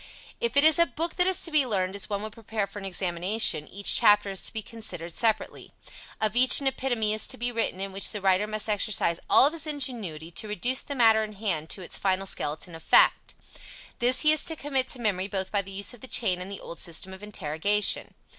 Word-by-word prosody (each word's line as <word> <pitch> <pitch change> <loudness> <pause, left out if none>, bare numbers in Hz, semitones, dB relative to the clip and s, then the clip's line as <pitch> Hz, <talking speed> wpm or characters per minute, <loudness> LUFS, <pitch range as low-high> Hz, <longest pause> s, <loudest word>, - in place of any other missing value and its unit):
If 470 -10 -2
it 280 - +6
is 315 +1 +6
a 340 - +5
book 330 +2 -3
that 360 0 +3
is 375 -1 +1
to 335 - -6
be 305 -2 +4
learned 195 -6 -1
as 200 - -5
one 200 0 -3
would 215 -1 -6
prepare 220 -2 -4
for 200 +1 -10
an 195 - -8
examination, 180 -2 0
each 200 +1 +1
chapter 205 -1 +4
is 195 - -2
to - - -1
be 220 -1 -5
considered 175 -8 -6
separately. 220 -2 -1 0.5
Of 215 +1 -1
each 255 +1 +6
an 280 - -4
epitome 245 -5 0
is 215 - -1
to - - -2
be 245 +1 -1
written 225 -5 -2
in 195 0 -4
which 195 +1 +1
the 210 - -5
writer 190 +1 +2
must 215 0 -2
exercise 205 -5 +1
all - - +7
of 295 - +1
his 325 -1 -5
ingenuity 225 - -3
to 170 +6 -4
reduce 225 +6 -1
the 280 - -6
matter 225 -3 +4
in 215 0 -7
hand 185 -7 -3
to 190 - -4
its - - -7
final 190 0 0
skeleton 160 -1 -3
of 165 - -10
fact. - - +3 0.6
This 250 +2 +3
he 305 - +5
is 310 - +2
to 320 - -1
commit 270 -3 -1
to 260 -2 -4
memory 195 -5 -1
both 190 -1 -4
by 205 - +1
the 195 - -13
use 200 +3 -1
of 240 - -14
the 260 - -9
chain 185 -8 +1
and 185 - -6
the 200 - -6
old 170 - -9
system 180 +2 -4
of 190 - -11
interrogation. 205 +1 +1
210 Hz, 240 wpm, -26 LUFS, 190-245 Hz, 0.6 s, all